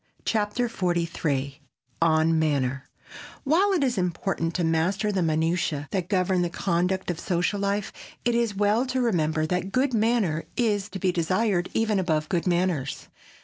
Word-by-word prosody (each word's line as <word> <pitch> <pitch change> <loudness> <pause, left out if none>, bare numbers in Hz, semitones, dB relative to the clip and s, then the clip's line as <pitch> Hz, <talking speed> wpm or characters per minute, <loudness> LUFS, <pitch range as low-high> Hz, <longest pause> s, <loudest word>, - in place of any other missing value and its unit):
CHAPTER 220 +3 0
XLIII 165 - -2 0.4
ON 160 0 +3
MANNER 135 -3 0 0.5
WHILE 365 +8 +3
it 340 -6 +2
is 245 -6 0
important 175 -1 -2
to 180 - 0
master 180 +6 +1
the 195 -2 0
minutiæ 160 -2 0
that 185 -2 -2
govern 185 -2 +2
the 175 - 0
conduct 180 +1 -1
of 170 - -6
social 180 +3 0
life, 200 0 -1 0.3
it 240 - +2
is 235 -3 0
well 210 +5 +2
to 260 +1 -1
remember 160 -10 +1
that 180 +3 -1
a - - -6
good 255 +6 0
manner 215 -8 +1
is 210 -4 +1
to 195 - -6
be 185 -1 +1
desired 180 +2 0
even 220 -3 +2
above 155 -4 0
good 175 0 0
manners. 175 -6 -1
180 Hz, 160 wpm, -25 LUFS, 165-210 Hz, 0.5 s, ON